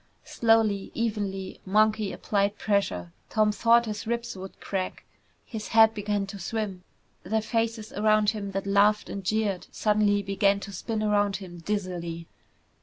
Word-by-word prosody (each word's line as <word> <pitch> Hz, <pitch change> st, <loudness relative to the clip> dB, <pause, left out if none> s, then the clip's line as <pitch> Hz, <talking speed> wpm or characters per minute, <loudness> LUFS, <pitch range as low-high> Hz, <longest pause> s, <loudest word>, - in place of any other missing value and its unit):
Slowly, 225 Hz, -4 st, +2 dB
evenly, 205 Hz, -4 st, -3 dB
Monkey 215 Hz, +1 st, +2 dB
applied 200 Hz, 0 st, 0 dB
pressure. 90 Hz, -, -1 dB, 0.2 s
Tom 215 Hz, -1 st, +3 dB
thought 235 Hz, +2 st, +4 dB
his 215 Hz, 0 st, -5 dB
ribs 235 Hz, -1 st, -2 dB
would 190 Hz, 0 st, -9 dB
crack. 190 Hz, -2 st, -4 dB, 0.4 s
His 220 Hz, -3 st, -6 dB
head 225 Hz, 0 st, +6 dB
began 205 Hz, -1 st, -1 dB
to 195 Hz, 0 st, -8 dB
swim. 195 Hz, -1 st, -3 dB, 0.4 s
The 220 Hz, +4 st, 0 dB
faces 225 Hz, 0 st, -2 dB
around 215 Hz, 0 st, +3 dB
him 205 Hz, -2 st, -5 dB
that 195 Hz, 0 st, -2 dB
laughed 205 Hz, +2 st, +3 dB
and 200 Hz, -, -5 dB
jeered 205 Hz, -1 st, -1 dB
suddenly 210 Hz, -1 st, +2 dB
began 200 Hz, +1 st, +2 dB
to 200 Hz, -, -7 dB
spin 215 Hz, +3 st, -3 dB
around 205 Hz, -1 st, +2 dB
him 180 Hz, -3 st, -8 dB
dizzily. 170 Hz, -3 st, -3 dB
205 Hz, 145 wpm, -27 LUFS, 195-215 Hz, 0.4 s, head